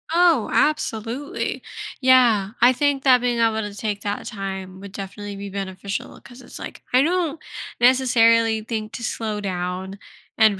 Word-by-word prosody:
Oh, 335 -7 +3
absolutely! 255 -2 -1 0.4
Yeah, 240 -6 +5
I 245 +2 +6
think 285 0 0
that 255 -3 +5
being 245 -1 0
able 225 -1 +2
to 210 -1 -5
take 205 -1 -3
that 205 0 -3
time 190 -3 -6
would 200 0 -10
definitely 200 +1 -7
be 200 0 -7
beneficial, 195 0 -5
'cause 245 0 -14
it's 245 - -10
like, - - -9
I 255 - +6
don't 330 0 0 0.4
necessarily 230 -3 +4
think 215 -1 -4
to 240 - -6
slow 220 -3 -3
down 185 0 -4 0.4
and 215 -3 +4
220 Hz, 155 wpm, -22 LUFS, 200-255 Hz, 0.4 s, I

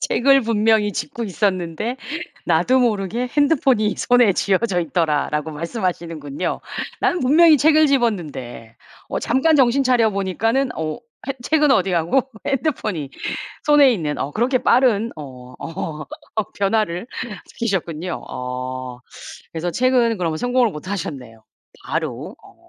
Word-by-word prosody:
책을 275 +1 +3
분명히 220 -2 +2
집고 180 +10 -4
있었는데 190 - -1 0.5
나도 175 +11 +3
모르게 225 +1 0
핸드폰이 265 -8 +3
손에 245 -5 +4
쥐어져 190 -1 +1
있더라라고 150 -1 0
말씀하시는군요. 165 - -3 0.4
나는 355 - +1
분명히 310 +4 +6
책을 310 +1 +5
집었는데 155 - -2 0.3
어 - - -1
잠깐 295 +6 +2
정신 265 +1 +4
차려보니까는 225 +1 +1
어 155 +5 -3 0.3
해 - - +1
책은 300 0 +3
어디 190 -5 +2
가고 175 +10 +2 0.2
핸드폰이 215 - -2 0.5
손에 295 -3 +6
있는 155 -8 -2
어 140 - -2
그렇게 250 - +1
빠른 235 -3 +3
어 125 -4 -10 0.8
어 215 - +1
변화를 200 0 0 0.4
시키셨군요. 180 -6 -3
어 125 0 -5 0.5
그래서 170 +1 -3
책은 245 0 +2
그럼 165 -3 -1
성공을 245 +1 +2
못하셨네요. 145 - -6 0.4
바로 - - -4
어. - - -20
205 Hz, 290 characters per minute, -21 LUFS, 160-250 Hz, 0.8 s, 분명히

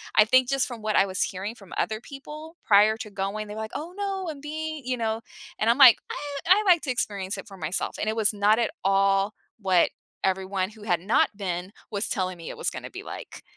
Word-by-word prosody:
I 215 - +8
think 255 +3 +4
just 275 -1 +1
from 235 -3 -7
what 215 0 -1
I 195 - +5
was 190 0 -3
hearing 195 +4 -2
from 195 -6 -14
other 215 0 -1
people 300 +5 -10
prior 210 +1 +5
to 215 - -6
going, 200 +2 -3
they 210 - -7
were - - -5
like, 220 - -5
"Oh, 325 +4 -5
no, 390 -3 -2
I'm 285 - -10
being" 310 0 -5
you 255 0 0
know, 225 -1 -1 0.4
and 220 - +2
I'm 235 - +4
like, 260 -5 +9
"I - - -4 0.3
I 385 +4 +6
like 355 -3 +6
to 270 - -1
experience 200 -5 -2
it - - -7
for 195 -3 -11
myself," 165 +1 -2
and - - -2
it 220 - -1
was 220 -1 +3
not 205 +1 +3
at 230 -1 +1
all 195 +1 +3 0.3
what 185 -4 +3 0.3
everyone 190 0 0
who 215 -1 -14
had 175 -5 +1
not 200 +5 +3
been 185 0 -4 0.2
was 205 0 0
telling 185 -2 -2
me 165 - -8
it - - -7
was - - 0
gonna - - -7
be - - -8
like. - - -9
215 Hz, 240 wpm, -26 LUFS, 195-255 Hz, 0.4 s, like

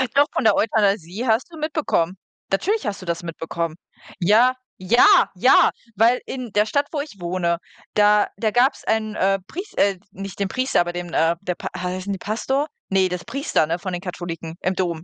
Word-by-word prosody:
Doch, 285 +1 +5
von - - 0
der 220 -2 +5
Euthanasie 205 -1 +1
hast 230 +9 +1
du 325 - -10
mitbekommen. 295 - 0 0.4
Natürlich 410 - 0
hast 200 -2 -3
du - - -9
das 170 0 -3
mitbekommen. 165 -1 -4 0.4
Ja, 220 +8 +4 0.2
ja, 205 +7 +5
ja, - - +6 0.3
weil 230 +4 +4
in 255 -4 -6
der 210 +1 +3
Stadt, 285 +6 0
wo 305 - -2
ich 285 -9 -9
wohne, 170 -1 -1 0.4
da 210 0 +4
da 215 0 0
gab's 250 +5 +2
einen, 215 -1 -1
äh, 195 +1 +2
Pries 385 +5 -7
äh, 200 -1 +3
nicht 195 0 -8
den 200 - 0
Priester, 255 -2 +1
aber 175 0 -2
dem 175 0 -5
n 170 - -11
äh, 165 +1 +3
der 180 -2 -2
P - - -7
heißen 185 +2 -3
die 195 - -3
Pastor? 265 +9 -1 0.2
Ne, 190 -1 +3
das 180 -1 -4
Priester, 275 - 0
ne, 170 +3 -2
von 185 0 -5
den 175 - -3
Katholiken, 170 -3 -6
im 185 +1 0
Dom. 170 -3 -2
195 Hz, 200 wpm, -22 LUFS, 175-235 Hz, 0.4 s, ja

